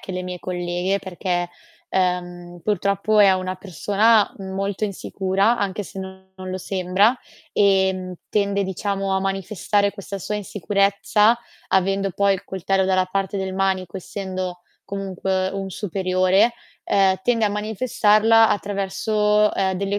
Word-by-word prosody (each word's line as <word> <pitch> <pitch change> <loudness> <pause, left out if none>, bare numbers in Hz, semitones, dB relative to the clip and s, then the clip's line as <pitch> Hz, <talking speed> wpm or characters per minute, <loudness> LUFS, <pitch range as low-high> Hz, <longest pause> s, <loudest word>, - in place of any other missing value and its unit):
che 190 - -7
le 180 - -3
mie 180 0 -6
colleghe, 180 +2 -2
perché, 175 -1 -2 0.4
uhm, 175 -1 -2
purtroppo 200 +2 +1
è 200 -2 +7
una 185 0 -2
persona 205 +4 +2
molto 195 +1 -3
insicura, 195 +2 0
anche 200 +1 -2
se 195 - -10
non 190 0 -8
lo 185 0 -5
sembra, 195 +6 +1 0.3
ehm, 190 -2 +2
tende 200 -1 +1
diciamo 195 +1 -2
a - - +2
manifestare 195 +1 0
questa 200 -1 -7
sua 210 - -3
insicurezza, 205 +2 +2 0.3
avendo 195 +1 +1
poi 200 +2 +2
il 195 +1 -7
coltello 190 0 0
dalla 185 -1 +2
parte 195 +1 -2
del 190 -1 -3
manico, 190 -2 -1
essendo 185 -1 -5 0.2
comunque 190 -1 -2
un 195 0 -5
superiore, 185 +3 +2 0.3
ehm, 195 -1 +3
tende 235 -2 +2
a - - +1
manifestarla 215 +1 +3
attraverso, 210 +1 +1
ehm, 190 -1 0
delle 200 +2 -1
195 Hz, 130 wpm, -22 LUFS, 185-205 Hz, 0.4 s, è